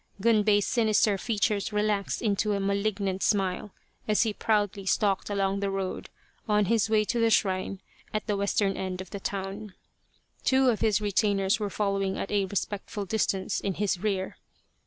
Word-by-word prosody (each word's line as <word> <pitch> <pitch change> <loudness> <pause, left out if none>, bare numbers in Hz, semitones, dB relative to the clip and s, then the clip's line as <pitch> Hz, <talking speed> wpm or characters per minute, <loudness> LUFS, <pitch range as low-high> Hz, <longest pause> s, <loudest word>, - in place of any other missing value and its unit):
Gunbei's 210 -1 +3
sinister 215 -3 +3
features 210 -1 0
relaxed 210 0 0
into 210 -1 +1
a 200 - 0
malignant 200 -1 -1
smile 195 0 0 0.4
as 215 +1 +3
he 220 -2 -1
proudly 205 -2 0
stalked 195 +1 +1
along 195 -1 0
the 200 0 -1
road 195 -1 -4 0.4
on 210 -1 +3
his 225 0 +2
way 215 -1 +3
to 235 - -1
the 230 0 +4
shrine 190 -2 +1 0.3
at 215 - -2
the 210 - 0
western 200 0 +1
end 185 -1 -4
of 185 -1 -8
the 200 - -5
town. 195 +1 -5 0.7
Two 265 0 +4
of 220 - -2
his 215 -2 +2
retainers 205 0 +1
were 210 -1 -2
following 195 -1 -1
at - - -4
a 200 -1 +2
respectful 200 +2 -3
distance 195 -2 0
in 195 -2 -2
his 200 -3 0
rear. 195 -2 -2
200 Hz, 165 wpm, -27 LUFS, 195-215 Hz, 0.7 s, the